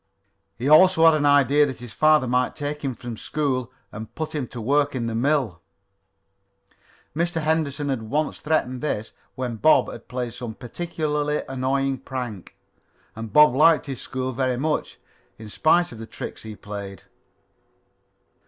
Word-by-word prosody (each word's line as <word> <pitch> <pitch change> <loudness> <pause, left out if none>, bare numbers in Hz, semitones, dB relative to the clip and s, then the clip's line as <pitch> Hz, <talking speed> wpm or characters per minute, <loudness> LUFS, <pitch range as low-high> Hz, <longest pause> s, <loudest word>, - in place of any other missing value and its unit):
He 125 - -3
also 165 +2 +6
had 165 - +8
an 150 -1 +2
idea 145 +1 +4
that 130 - -5
his 120 -2 -10
father 155 -3 +4
might 125 +1 0
take 150 0 -4
him 135 -3 -2
from 120 -2 -7
school 130 -4 -2 0.2
and 110 +1 -9
put 155 -1 -4
him 145 -5 -3
to 120 - -8
work 140 +5 +1
in 120 -2 -2
the 115 - -3
mill. 120 - 0 1.5
Mr. 170 +1 0
Henderson 155 -2 -1
had 130 -4 -1
once 145 +8 -2
threatened 140 -5 -1
this 110 -8 -3 0.2
when 125 -3 -4
Bob 155 +8 +4
had - - -11
played 125 -2 -4
some 120 -3 -7
particularly 150 +2 -2
annoying 135 0 -1
prank. 125 -7 -6 0.6
And 110 -1 -7
Bob 150 +3 +7
liked 155 +3 +4
his 135 -3 -6
school 130 0 -4
very 130 0 0
much, 150 +4 -2 0.4
in 110 -1 -10
spite 170 +9 +2
of 115 - -10
the 115 - -8
tricks - - -7
he 110 -1 -8
played. 100 -2 -8
135 Hz, 160 wpm, -23 LUFS, 120-150 Hz, 1.5 s, had